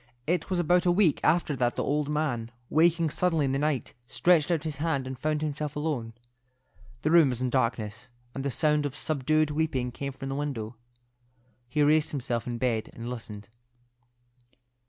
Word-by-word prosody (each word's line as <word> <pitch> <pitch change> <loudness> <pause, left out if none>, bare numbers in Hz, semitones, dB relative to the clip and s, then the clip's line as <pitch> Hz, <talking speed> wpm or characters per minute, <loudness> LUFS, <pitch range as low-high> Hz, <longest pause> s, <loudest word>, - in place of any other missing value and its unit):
It 175 +2 0
was 185 - 0
about 175 +1 +3
a - - +5
week 175 -4 +3
after 160 -3 +2
that 120 -1 +1
the - - -1
old 150 0 0
man, 140 -7 -1 0.2
waking 165 0 +3
suddenly 165 -4 +1
in 135 - 0
the 135 - 0
night, 150 -3 -1
stretched 165 +3 +3
out 165 -3 +1
his 155 -3 -4
hand 145 -3 -1
and 130 0 -5
found 155 0 -1
himself 150 0 -3
alone. 145 -7 -2 0.9
The 155 - +2
room 165 -4 +7
was 125 -2 -3
in 125 -1 -1
darkness, 115 -4 -1 0.3
and 135 - -4
the 140 - 0
sound 150 +1 +2
of 140 - -8
subdued 155 +1 +1
weeping 145 -5 -1
came 140 +2 -5
from 135 0 -7
the - - -2
window. 130 -6 -3 0.9
He 150 +3 +2
raised 155 +1 +4
himself 125 -5 -3
in 120 -1 -3
bed 115 -3 -1
and 120 +1 -6
listened. 105 -4 -7
145 Hz, 180 wpm, -28 LUFS, 125-155 Hz, 0.9 s, room